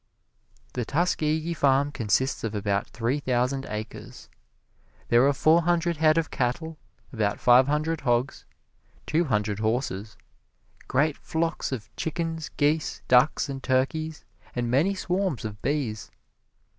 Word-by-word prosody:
The 125 - -2
Tuskegee 155 +3 0
farm 140 -1 +2
consists 130 +2 0
of 110 -1 -3
about 100 -1 -1
three 120 +5 -1
thousand 130 0 0
acres. 105 0 -7 0.8
There 120 +3 +5
are - - +4
four 155 +4 +4
hundred 170 0 +1
head 155 +1 +4
of 165 -1 0
cattle, 150 +5 -2 0.3
about 105 -3 0
five 125 +2 +6
hundred 155 +2 0
hogs, 120 +2 0 0.6
two 165 +3 +1
hundred 105 -5 -1
horses, 110 -3 -2 0.7
great 145 +3 +1
flocks 165 -1 -2
of 110 -6 -6
chickens, 160 0 -3
geese, 150 +2 0
ducks 125 +5 +4
and 135 -1 -5
turkeys, 150 +5 -1 0.3
and 120 -1 -1
many 165 +10 +2
swarms 185 - -1
of 105 -1 -6
bees. 125 -8 -2
140 Hz, 130 wpm, -26 LUFS, 120-160 Hz, 0.8 s, five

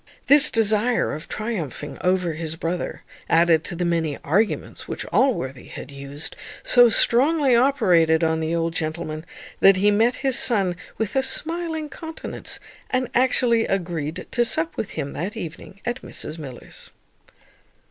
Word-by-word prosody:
This 285 0 +7
desire 225 +2 +2
of 155 - -7
triumphing 175 - -5
over 180 -2 +1
his 160 0 -4
brother, 165 +2 -4 0.3
added 165 -1 +4
to - - -6
the 175 +1 -2
many 165 -4 0
arguments 205 +9 -1
which - - -5
Allworthy 135 - +1
had 140 - -9
used, 140 +2 -6 0.3
so 245 -1 +6
strongly 270 +4 +3
operated 180 - +3
on 160 0 +1
the 160 +1 -1
old 165 0 -1
gentleman 155 0 -4 0.3
that 195 0 +7
he 200 +2 +3
met 225 +4 +3
his 265 0 +3
son 195 -9 +3 0.2
with 220 +1 -3
a 265 - +4
smiling 320 +3 -1
countenance, 320 +2 -7 0.3
and 255 -1 -1
actually 245 -2 +2
agreed 170 -3 -3
to 240 - +2
sup 320 +7 0
with 210 - -3
him 140 - -3
that 185 +6 -4
evening 175 +4 -8
at 240 +2 -3
Mrs 160 - -7
Miller's. 135 -5 -11
190 Hz, 145 wpm, -23 LUFS, 160-245 Hz, 0.3 s, This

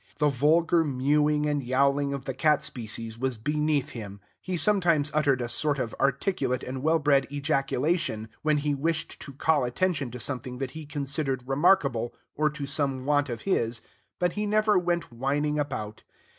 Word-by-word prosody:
The 150 -1 +3
vulgar 160 +5 +3
mewing 150 +2 +2
and 145 -1 0
yowling 140 +2 +1
of 140 -2 -5
the 135 - -3
cat 150 +3 +2
species 115 -1 -4
was 130 -2 -1
beneath 150 +3 0
him; 105 -7 -8 0.2
he 185 -1 -3
sometimes 170 -5 +2
uttered 140 -4 +2
a - - -2
sort 145 +4 0
of 120 -4 -3
articulate 135 -2 0
and 130 0 -5
well 160 +3 +3
bred 140 -3 +3
ejaculation, 140 -4 0
when 155 -1 +2
he 145 0 0
wished 155 +3 -2
to 140 - -8
call 145 +1 +2
attention 140 +2 0
to 125 +2 -8
something 125 0 -3
that 130 -1 -4
he 155 -2 -9
considered 140 -2 -2
remarkable, 135 -5 +2 0.2
or 150 0 +1
to 150 -1 -5
some 140 -2 -1
want 145 -1 +2
of 120 -2 -4
his, 115 - 0 0.4
but 180 -1 0
he 210 0 -2
never 215 0 +3
went 175 -5 0
whining 145 +4 0
about. 110 -7 -4
145 Hz, 170 wpm, -27 LUFS, 130-155 Hz, 0.4 s, The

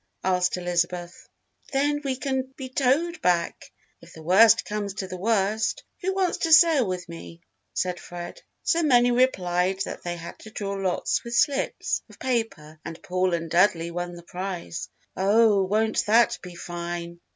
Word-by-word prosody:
asked 180 -1 +1
Elizabeth. 175 0 -2 0.4
"Then 290 +1 +1
we 270 -2 -1
can 265 0 -2
be 265 -2 -6
towed 285 +7 +1
back 175 -1 0 0.3
if 170 0 -15
the 160 - -12
worst 200 +7 +6
comes 205 -1 -4
to 190 - -4
the 185 - -6
worst. 210 +2 0 0.2
Who 380 +1 -1
wants 375 -2 0
to 330 - 0
sail 315 - +6
with 180 -1 -4
me?" 170 0 -10 0.3
said 180 -1 -1
Fred. 175 0 -8 0.2
So 335 - +2
many 245 -5 +4
replied 190 -7 +1
that - - -7
they 175 0 -4
had 170 0 -9
to 220 - -11
draw 200 -2 -4
lots 195 -2 -1
with 235 0 -5
slips 275 +2 +1
of - - -15
paper 225 -12 -3
and 165 - -8
Paul 185 0 0
and 165 0 -4
Dudley 170 0 +2
won 175 0 -4
the 170 - -11
prize. 180 -2 -5 0.3
"Oh, 205 +1 +4
won't 220 +3 +1
that 235 +2 +4
be 180 -1 -10
fine!" 170 0 -6
190 Hz, 165 wpm, -25 LUFS, 175-240 Hz, 0.4 s, worst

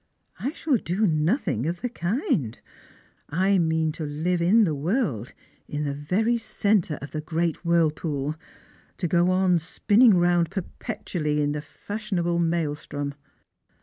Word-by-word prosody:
" - - -46
I 270 - -1
shall 300 -5 +1
do 195 +2 0
nothing 155 - +1
of 170 +1 -3
the 245 - -1
kind. 175 - -1 0.7
I 190 +5 +2
mean 160 -1 +1
to 160 - -6
hve 160 +4 -1
in 205 +7 +5
the 165 -6 +1
world, 145 - -1 0.3
in 150 0 -3
the 140 -1 -1
very 200 +12 0
centre 200 -8 0
of 140 - -7
the 155 - -3
great 165 +1 -1
whirlpool 155 -3 +1 0.3
— - - -31
to 180 - -1
go 180 +1 +3
spinning 205 +6 +4
round 175 -1 +3
perpetually 165 -4 -3
in 145 0 +1
the 150 0 -3
fashionable 180 -1 -3
maelstrom." 150 -4 -1
170 Hz, 145 wpm, -25 LUFS, 150-190 Hz, 0.7 s, in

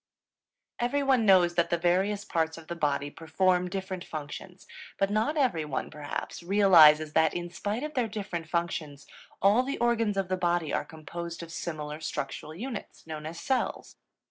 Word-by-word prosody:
Everyone 260 -2 +2
knows 180 -3 +6
that 170 -1 +1
the 170 - +1
various 190 +4 +1
parts 160 -1 -1
of 165 - -11
the 170 - -5
body 145 -3 -1
perform 180 +3 +1
different 190 -1 -4
functions; 160 +5 -8 0.3
but 195 0 +1
not 220 +9 +1
everyone, 160 - 0
perhaps, 150 +3 -5
realizes 165 -5 +6
that, 160 -1 +3
in 175 0 -4
spite 205 +7 -3
of 305 0 -4
their 250 -4 +1
different 195 -7 -5
functions, 160 -4 -3 0.4
all 205 +5 +6
the 275 +2 -3
organs 230 -4 +1
of 195 -2 0
the 185 0 -1
body 175 -4 0
are - - 0
composed 170 +2 -7
of 165 - -10
similar 155 -3 -5
structural 155 0 -5
units, 230 +2 -7
known 155 -1 -6
as 165 +1 -7
cells. 260 +8 -2
175 Hz, 165 wpm, -28 LUFS, 160-205 Hz, 0.4 s, knows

